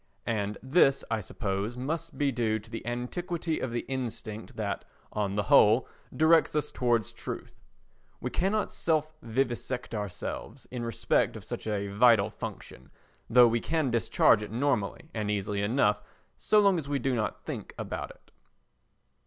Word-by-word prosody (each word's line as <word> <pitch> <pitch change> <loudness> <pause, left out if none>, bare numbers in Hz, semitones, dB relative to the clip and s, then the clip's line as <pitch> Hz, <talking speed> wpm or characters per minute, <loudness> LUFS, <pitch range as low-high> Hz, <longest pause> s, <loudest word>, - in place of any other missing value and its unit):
And 105 -2 -1
this 135 0 +4
I 110 -1 +1
suppose 100 +3 -3
must 150 +6 -3
be 145 -2 +2
due 115 -3 0
to 110 +1 -12
the 115 - -5
antiquity 160 +7 -2
of 130 - -2
the 120 - -1
instinct 115 -4 -5
that, - - -3 0.3
on 100 -2 -1
the 105 - +1
whole, 110 +4 +5 0.2
directs 160 0 +4
us 150 - 0
towards 120 -4 +1
truth. - - -7 0.6
We - - -4
cannot 205 +4 0
self 155 -1 0
vivisect 125 0 -2
ourselves 105 +4 -5
in 125 -1 -4
respect 115 -1 +1
of - - -10
such - - -6
a 100 -2 -1
vital 110 0 +5
function, 65 -9 -8 0.4
though 120 +1 +8
we 115 +1 +1
can 155 -1 0
discharge 115 -1 +4
it 105 - -6
normally 125 +2 -1
and 105 -2 -2
easily 100 0 -1
enough 105 -1 +2 0.3
so 215 - +3
long 200 -4 +4
as 140 -3 -7
we 145 - +1
do 135 0 0
not 110 -3 -2
think - - -6
about - - -4
it. - - -17
120 Hz, 160 wpm, -29 LUFS, 105-140 Hz, 0.6 s, though